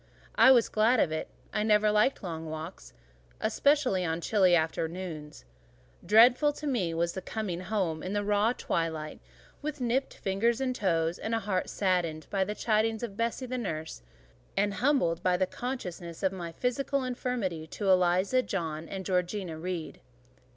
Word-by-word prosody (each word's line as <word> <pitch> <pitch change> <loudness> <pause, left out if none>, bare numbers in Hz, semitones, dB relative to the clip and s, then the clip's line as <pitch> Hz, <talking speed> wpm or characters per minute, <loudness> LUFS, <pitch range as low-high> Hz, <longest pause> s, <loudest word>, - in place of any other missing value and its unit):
I - - +7
was 245 -3 +6
glad 225 +3 +3
of 155 - +2
it: 155 - -3 0.3
I 210 - 0
never 210 0 +4
liked 215 +4 +2
long 165 -3 -5
walks, 160 +3 -7 0.5
especially 280 -10 +2
on 165 -1 -1
chilly 185 -1 +4
afternoons: 160 - -3 0.6
dreadful 245 - +6
to 300 - -8
me 230 - 0
was 170 +1 0
the 190 - -5
coming 200 -6 -4
home 185 -5 -2
in 185 - -4
the 205 0 0
raw 205 +2 +2
twilight, 160 -8 -3 0.4
with 300 0 -4
nipped 250 +2 0
fingers 220 +5 0
and 260 -1 -1
toes, 170 -5 0
and 225 +1 -2
a - - +1
heart 190 -2 -1
saddened 175 -5 0
by 195 -1 +2
the 210 +2 -4
chidings 220 0 +1
of 215 -5 -5
Bessie, 230 +3 -2
the 255 0 -3
nurse, 160 - -5 0.6
and 205 +1 +2
humbled 205 - +1
by 180 -1 +2
the 185 - +2
consciousness 180 -8 -6
of 190 - +3
my 175 -3 -6
physical 265 +6 -1
inferiority 240 -10 -3
to 205 - -4
Eliza, 185 +7 +3
John, 165 -8 -4
and 190 -1 -5
Georgiana 180 -2 -1
Reed. 175 -1 -5
195 Hz, 165 wpm, -29 LUFS, 170-230 Hz, 0.6 s, I